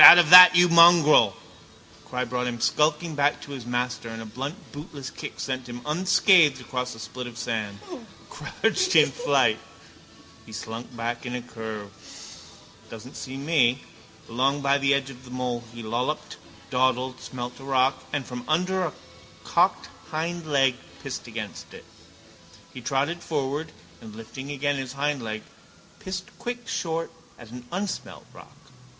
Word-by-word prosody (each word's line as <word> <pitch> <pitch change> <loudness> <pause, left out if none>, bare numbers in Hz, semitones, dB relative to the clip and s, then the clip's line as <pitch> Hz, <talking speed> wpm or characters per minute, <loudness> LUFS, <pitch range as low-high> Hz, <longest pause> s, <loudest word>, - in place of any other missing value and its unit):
Out - - +13
of 170 -2 +4
that, 180 0 +12
you 175 0 +6
mongrel! 170 - +6 0.6
The - - -22
cry 125 0 -2
brought 125 +1 -2
him 120 -1 -4
skulking 155 +6 +1
back 145 0 +1
to 145 - -10
his 130 -4 -7
master 125 -1 -2
and 115 0 -7
a 115 - -7
blunt 135 +8 -5 0.2
bootless 145 -2 -8
kick - - -8
sent 130 -2 -4
him 120 0 -7
unscathed 180 -1 +4
across 125 -1 -4
a - - -13
spit 120 +3 -7
of 120 -1 -10
sand, 110 -4 -3 0.5
crouched 375 -6 -1
in - - +6
flight. - - +2 0.8
He 110 - -14
slunk 115 +2 -7
back 120 +2 -4
in 125 - -4
a 125 - -3
curve. 110 -4 -7 1.0
Doesn't 115 +4 -10
see 130 0 -7
me. 140 -4 +2 0.4
Along 135 +5 0
by 140 0 +2
the 140 0 +2
edge 135 0 -3
of 125 -1 -14
the 125 - -14
mole 125 -1 -3
he 120 -1 -9
lolloped, 125 +7 -3 0.3
dawdled, 130 0 0
smelt 125 0 -7
a - - -12
rock 135 0 +1
and 145 -2 -2
from 125 -1 -7
under 180 +4 +1
a 165 -6 -2 0.5
cocked - - +1 0.2
hindleg 155 -5 0 0.3
pissed - - -6
against - - -7
it. - - -13 0.9
He 130 - -8
trotted 140 +8 -1
forward 150 0 -3 0.3
and, 110 -1 -11
lifting 115 +5 -9
again 145 0 -1
his 130 -1 -5
hindleg, 135 -7 -3 0.6
pissed 185 0 -5
quick 245 -1 -5
short 165 -1 -3 0.3
at 115 -2 -13
an 125 0 -10
unsmelt 190 +3 -5
rock. - - -15
130 Hz, 155 wpm, -25 LUFS, 120-155 Hz, 1.0 s, Out